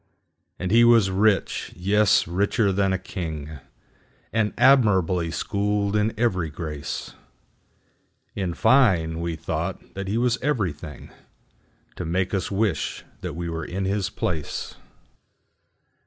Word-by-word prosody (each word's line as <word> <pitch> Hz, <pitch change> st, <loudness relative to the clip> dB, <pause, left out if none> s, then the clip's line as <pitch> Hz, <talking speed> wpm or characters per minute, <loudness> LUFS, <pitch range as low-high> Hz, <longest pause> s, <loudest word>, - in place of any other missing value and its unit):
And 90 Hz, 0 st, -3 dB
he 115 Hz, +2 st, +6 dB
was 115 Hz, -5 st, +5 dB
rich,—yes, 100 Hz, 0 st, +2 dB
richer 100 Hz, +4 st, +1 dB
than 95 Hz, 0 st, +1 dB
a 95 Hz, -, +1 dB
king,—And 80 Hz, +5 st, -6 dB
admirably 100 Hz, -10 st, +4 dB
schooled 100 Hz, +3 st, -1 dB
in 105 Hz, +1 st, +2 dB
every 95 Hz, -9 st, +1 dB
grace:In 80 Hz, +3 st, -8 dB
fine, 90 Hz, -12 st, +3 dB
we 85 Hz, -1 st, -2 dB
thought 80 Hz, -, -4 dB
that 100 Hz, 0 st, -5 dB
he 105 Hz, +4 st, -1 dB
was 125 Hz, 0 st, +1 dB
everythingTo 90 Hz, -, -3 dB, 0.9 s
make 90 Hz, +4 st, -1 dB
us 95 Hz, -3 st, -1 dB
wish 100 Hz, -5 st, -1 dB, 0.2 s
that -, -, -5 dB
we 85 Hz, 0 st, -4 dB
were 80 Hz, 0 st, -4 dB
in 95 Hz, +2 st, -3 dB
his 100 Hz, 0 st, 0 dB
place. 80 Hz, -4 st, -3 dB
95 Hz, 110 wpm, -24 LUFS, 85-105 Hz, 0.9 s, he